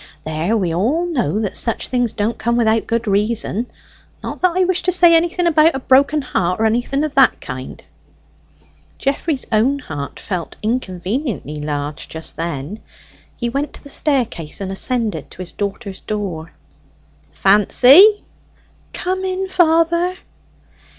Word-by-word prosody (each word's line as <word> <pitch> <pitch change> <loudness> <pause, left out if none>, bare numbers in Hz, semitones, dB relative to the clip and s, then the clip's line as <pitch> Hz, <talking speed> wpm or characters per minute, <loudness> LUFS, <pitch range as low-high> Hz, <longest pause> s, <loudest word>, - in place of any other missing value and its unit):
There, 160 +8 -1
we 180 -5 -1
all 255 - +1
know 240 - -1
that 205 - -3
such 230 - -1
things 245 -3 0
don't 220 +2 -2
come 235 +1 0
without 225 -1 +2
good 230 0 -1
reason 215 +2 0 0.6
not - - -6
that 365 -1 +2
I 370 - +4
wish 370 0 0
to 365 - +1
say 345 -1 +5
anything 340 +2 +2
about 325 -1 +4
a - - -2
broken 280 +3 +3
heart, 180 -7 -1
or 225 - +2
anything 245 +6 0
of 305 -2 -3
the 270 -2 +6
kind." 130 0 -8 1.1
Geoffrey's 275 0 -2
own 235 +6 +2
heart 145 - -7
felt 180 -5 -5
inconveniently 200 - -3
large 145 0 -4
just 160 0 -6
then. 165 +4 -5 0.6
He 240 - -2
went 280 +4 -3
to - - -12
the 285 - -12
staircase 245 - -1
and 195 -1 -4
ascended 230 +2 -2
to - - -15
his 170 - -8
daughter's 200 0 -5
door. 185 -6 -4 0.8
"Fancy!" 260 - +6 0.7
"Come 375 +1 -2
in, 380 0 -2
father." 340 0 +2
235 Hz, 145 wpm, -18 LUFS, 190-305 Hz, 1.1 s, the